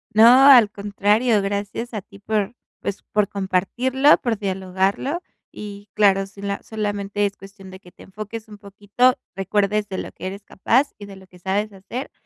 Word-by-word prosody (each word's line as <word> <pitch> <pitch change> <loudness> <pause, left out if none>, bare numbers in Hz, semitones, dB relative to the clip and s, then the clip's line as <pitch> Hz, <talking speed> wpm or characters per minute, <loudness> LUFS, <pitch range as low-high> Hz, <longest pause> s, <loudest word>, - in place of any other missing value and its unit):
No, 245 +5 +8
al 245 -6 +8
contrario, 205 +3 +1
gracias 205 +4 -4
a 210 - -3
ti 200 +1 -17
por, 210 +2 -2 0.3
pues, 200 - -4
por 210 -1 +2
compartirlo, 235 +9 +2
por 235 -4 -1
dialogarlo. 195 - -1 0.3
Y 205 -1 -9
claro, 195 -2 +3
sí 195 0 -14
la 200 0 -3
solamente 205 -1 -2
es 200 -1 -3
cuestión 195 -1 -13
de 190 - -11
que 180 -2 -17
te - - -16
enfoques 215 +3 -8
un 210 -1 -12
poquito, 205 +5 +1 0.2
recuerdes 205 +2 0
de 190 - -4
lo - - -5
que - - -7
eres 195 +2 -7
capaz 250 +9 +1
y 205 - -9
de 200 -1 -11
lo 190 0 -15
que 180 -1 -18
sabes 200 +4 -1
hacer, 205 +7 -7
205 Hz, 180 wpm, -22 LUFS, 195-220 Hz, 0.3 s, No